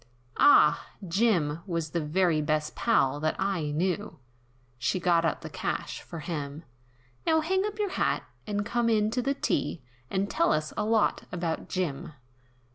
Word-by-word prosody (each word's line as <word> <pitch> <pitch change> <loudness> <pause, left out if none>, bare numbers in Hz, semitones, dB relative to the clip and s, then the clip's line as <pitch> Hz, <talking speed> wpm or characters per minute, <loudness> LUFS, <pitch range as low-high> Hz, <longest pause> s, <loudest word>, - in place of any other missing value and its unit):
"Ah! 160 - +6 0.2
Jim 170 -6 +2
was 165 -4 -2
the 170 - -1
very 160 +1 +2
best 150 0 -1
pal 145 - +2
that 155 +1 0
I 185 -6 -1
knew," 180 +7 -1 0.6
She 185 - 0
got 170 -1 +3
out 165 - 0
the - - -7
cash - - -3
for 165 - -8
him, 150 -1 -5 0.6
"Now 320 -1 +4
hang 380 +4 +1
up 420 0 -6
your 415 -3 -1
hat, - - 0 0.2
and 205 -1 -1
come 235 +1 +1
in 215 -1 +2
to 250 +2 0
the 275 +3 0
tea, 165 - -1 0.3
And 195 +1 0
tell 170 - +2
us 155 0 -1
a - - -1
lot 220 -1 +2
about 170 -2 -3
Jim." 165 -3 -3
175 Hz, 165 wpm, -28 LUFS, 155-215 Hz, 0.6 s, Ah